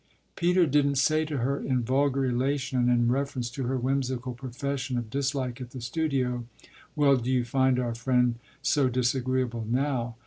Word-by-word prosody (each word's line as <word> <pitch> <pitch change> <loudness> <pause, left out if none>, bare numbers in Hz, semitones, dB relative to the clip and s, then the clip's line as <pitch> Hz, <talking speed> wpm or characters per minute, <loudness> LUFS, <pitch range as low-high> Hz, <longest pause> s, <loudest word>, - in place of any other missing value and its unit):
Peter 180 +1 +3
didn't 140 -1 +2
say 155 +4 +3
to 150 -2 -3
her 135 +3 0
in 130 -2 0
vulgar 135 +2 +1
elation 130 +1 0
and 120 0 +3
in 120 -1 +3
reference 130 -3 -2
to 130 0 -4
her 130 +1 0
whimsical 130 -1 -1
profession 130 +1 -4
of 115 -2 -4
dislike 135 -2 -2
at 125 - -7
the 130 - -8
studio, 125 -2 -1 0.5
"Well, 140 -3 +4
do 125 0 -3
you 125 -2 +2
find 130 +1 +2
our 120 -2 -1
friend 120 0 +1 0.2
so 140 -1 +3
disagreeable 125 -2 0
now?" 125 -2 -1
130 Hz, 170 wpm, -27 LUFS, 125-140 Hz, 0.5 s, Well